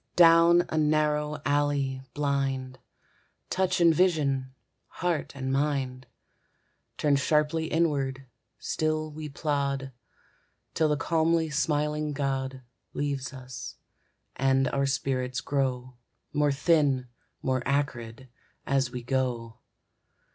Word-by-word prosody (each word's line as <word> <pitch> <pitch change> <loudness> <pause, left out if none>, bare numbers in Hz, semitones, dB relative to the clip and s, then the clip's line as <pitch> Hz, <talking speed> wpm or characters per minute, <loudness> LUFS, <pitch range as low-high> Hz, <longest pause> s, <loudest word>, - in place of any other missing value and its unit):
Down 170 0 +7
a 155 - 0
narrow 150 0 +1
alley, 145 -2 +1
blind, 135 -3 -1 0.7
Touch 185 -1 +1
and 170 -1 +6
vision, 145 -7 +1 0.4
heart 170 -5 -2
and 130 -1 -2
mind; 135 -2 -1 0.9
Turned 145 -2 +2
sharply 150 +3 +1
inward, 140 -5 0 0.3
still 155 0 -1
we 150 0 -7
plod, 140 -2 -2 0.8
Till 160 -1 +2
the 150 - +1
calmly 165 +1 +1
smiling 150 0 0
god 135 -2 -2 0.3
Leaves 140 -2 -2
us, 130 -2 -8 0.6
and 135 0 +2
our 140 0 0
spirits 130 -2 -1
grow 130 -2 -2 0.4
More 145 -1 +2
thin, 140 -3 +2 0.4
more 130 -1 +1
acrid, 130 -3 -2 0.4
as 135 -2 +1
we 125 -1 -6
go. 120 -3 -2
140 Hz, 105 wpm, -28 LUFS, 130-150 Hz, 0.9 s, Down